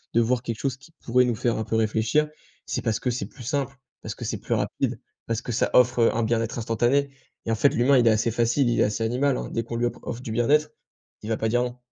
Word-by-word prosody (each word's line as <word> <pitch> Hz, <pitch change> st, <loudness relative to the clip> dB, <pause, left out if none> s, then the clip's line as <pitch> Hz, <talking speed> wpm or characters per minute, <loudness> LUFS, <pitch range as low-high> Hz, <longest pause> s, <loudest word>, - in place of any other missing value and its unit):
de 115 Hz, -, +5 dB
voir 120 Hz, +1 st, +1 dB
quelque 115 Hz, -2 st, -4 dB
chose 135 Hz, -2 st, -2 dB
qui 140 Hz, +5 st, -18 dB
pourrait 125 Hz, +1 st, +4 dB
nous 120 Hz, -2 st, 0 dB
faire 120 Hz, 0 st, 0 dB
un 110 Hz, -, -1 dB
peu 110 Hz, -, -3 dB
réfléchir, 110 Hz, +7 st, +1 dB, 0.4 s
c'est -, -, -3 dB
parce 115 Hz, -3 st, -1 dB
que 125 Hz, -, -1 dB
c'est 120 Hz, -, -3 dB
plus 125 Hz, -, -13 dB
simple, 135 Hz, +1 st, -2 dB, 0.3 s
parce -, -, -6 dB
que -, -, -7 dB
c'est -, -, -3 dB
plus -, -, -1 dB
rapide, -, -, -2 dB, 0.3 s
parce 115 Hz, -1 st, -1 dB
que -, -, -4 dB
ça 115 Hz, -, +1 dB
offre, 125 Hz, 0 st, +4 dB
heu, 115 Hz, -, +4 dB
un 115 Hz, -, +1 dB
bien 115 Hz, 0 st, +1 dB
être 115 Hz, +1 st, -4 dB
instantané. 120 Hz, +5 st, +1 dB, 0.3 s
Et 115 Hz, -, -1 dB
en 115 Hz, -, +2 dB
fait, 140 Hz, +6 st, +4 dB
l'humain 130 Hz, +3 st, +4 dB
il 120 Hz, -, +3 dB
est -, -, +8 dB
assez 110 Hz, +2 st, +1 dB
facile, 120 Hz, +3 st, +2 dB
il 120 Hz, -, +1 dB
est -, -, +5 dB
assez 105 Hz, +2 st, -1 dB
animal, 125 Hz, +4 st, +1 dB
hein, -, -, -5 dB
dès 115 Hz, -, -1 dB
qu'on 115 Hz, +1 st, -6 dB
lui 120 Hz, +1 st, 0 dB
op 120 Hz, -, -2 dB
offre 120 Hz, -, -5 dB
du 110 Hz, -, -5 dB
bien 120 Hz, +4 st, 0 dB
être, 150 Hz, +1 st, +3 dB, 0.5 s
il 110 Hz, -, -7 dB
va 110 Hz, -, 0 dB
pas 110 Hz, -, -1 dB
dire 120 Hz, +1 st, +2 dB
non. 125 Hz, 0 st, -5 dB
120 Hz, 285 wpm, -25 LUFS, 115-125 Hz, 0.5 s, est